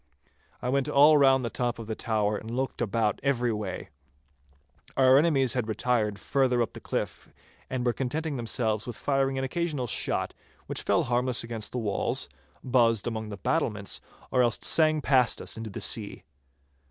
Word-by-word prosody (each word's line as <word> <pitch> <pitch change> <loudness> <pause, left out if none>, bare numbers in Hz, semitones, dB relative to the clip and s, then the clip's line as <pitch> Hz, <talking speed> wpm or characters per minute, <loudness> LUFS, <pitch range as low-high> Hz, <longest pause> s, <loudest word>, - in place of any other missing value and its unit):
I 125 - -1
went 140 +2 +1
all 150 +2 +6
round 135 -2 +4
the 115 - -3
top 120 -1 -1
of 115 - -7
the 110 - -3
tower 105 -2 0
and 110 +2 -7
looked 130 +2 -3
about 110 -1 0
every 125 -4 +1
way. 100 -4 -5 1.1
Our 130 -1 +6
enemies 140 -6 +3
had 125 -4 -1
retired 110 -1 0
further 130 +2 +1
up 115 - -6
the - - -8
cliff, - - -4 0.4
and 130 -1 -2
were 120 - +2
contenting 150 +5 -2
themselves 115 -3 -1
with 120 - -5
firing 135 -1 0
an 135 - -1
occasional 150 -1 -2
shot, 115 - -1 0.3
which - - -4
fell - - +2
harmless 125 0 +1
against 115 -2 -5
the - - -4
walls, 105 -4 -1 0.3
buzzed 115 -4 +3
among 110 -2 -3
the 100 - -6
battlements, 105 - -1 0.3
or 125 - +3
else 120 -2 +2
sang 155 -1 +4
past 130 -4 +3
us - - -5
into 110 0 -6
the 95 - -6
sea. 105 -3 -1
120 Hz, 175 wpm, -27 LUFS, 110-135 Hz, 1.1 s, all